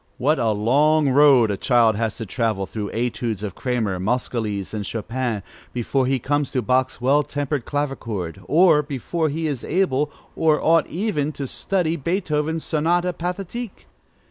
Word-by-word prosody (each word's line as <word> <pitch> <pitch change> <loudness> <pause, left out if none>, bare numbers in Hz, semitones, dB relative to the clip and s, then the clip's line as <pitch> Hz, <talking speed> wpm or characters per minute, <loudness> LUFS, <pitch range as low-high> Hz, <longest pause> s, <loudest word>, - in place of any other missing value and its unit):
What 150 +5 +2
a 115 - +2
long 140 +8 +3
road 130 -5 +5
a 100 - -2
child 115 -1 +3
has 110 0 -2
to 115 - -5
travel 110 -2 -1
through 105 +1 -5
Etudes 115 -3 -2
of 100 -4 -4
Cramer, 115 -8 -2
Moscheles, 110 -2 -2
and 105 -1 -3
Chopin, 115 0 -3 0.3
before 125 +2 0
he 135 0 +2
comes 145 +3 -1
to 125 - -1
Bach's 130 +3 +1
Well 135 +4 +3
tempered 145 -2 -3
Clavichord, 115 - -3
or 155 - +5
before 150 +3 -2
he 160 +3 -3
is 145 -6 -2
able, 150 -5 +1 0.3
or 155 -2 +3
ought 165 -1 +3
even, 165 -6 -1
to 140 - -5
study 170 +3 -1
Beethoven's 160 -1 -1
Sonate 175 +3 +1
Pathétique! 190 +6 -5
135 Hz, 155 wpm, -22 LUFS, 115-155 Hz, 0.3 s, road